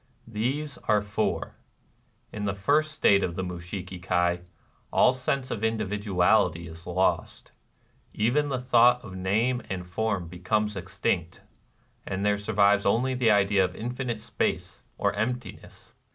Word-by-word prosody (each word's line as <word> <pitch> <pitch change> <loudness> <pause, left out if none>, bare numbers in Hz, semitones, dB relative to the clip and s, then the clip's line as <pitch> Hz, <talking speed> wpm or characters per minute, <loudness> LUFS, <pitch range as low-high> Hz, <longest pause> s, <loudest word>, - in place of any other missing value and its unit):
These 130 +6 -3
are 105 - +4
four. 100 -1 -2 0.8
In 105 -1 -4
the 100 -1 -1
first 150 +10 +2
state 100 -9 +3
of 85 - -2
the 95 - -2
Mushiki 90 +1 -6
Kai, 90 -1 +1 0.5
all - - +5
sense 130 0 -2
of 110 - -3
individuality 105 -5 +1
is 80 +1 -11
lost: 90 +2 -1 0.6
even 140 +7 +1
the 130 -2 -1
thought 125 0 +4
of 95 - -9
name 110 +7 0
and 95 -2 -4
form 95 0 -2
becomes 105 +5 -1
ex 95 +2 -8
tinct, 85 -2 -1 0.6
and 95 +1 -3
there 105 0 +2
survives 100 -1 +3
only 125 +6 +2
the 125 -3 +2
idea 100 -1 +4
of 90 0 -2
Infinite 120 -1 -4
Space, - - -2 0.2
or 100 0 +1
Emptiness. 125 +4 -5
105 Hz, 140 wpm, -27 LUFS, 95-120 Hz, 0.8 s, all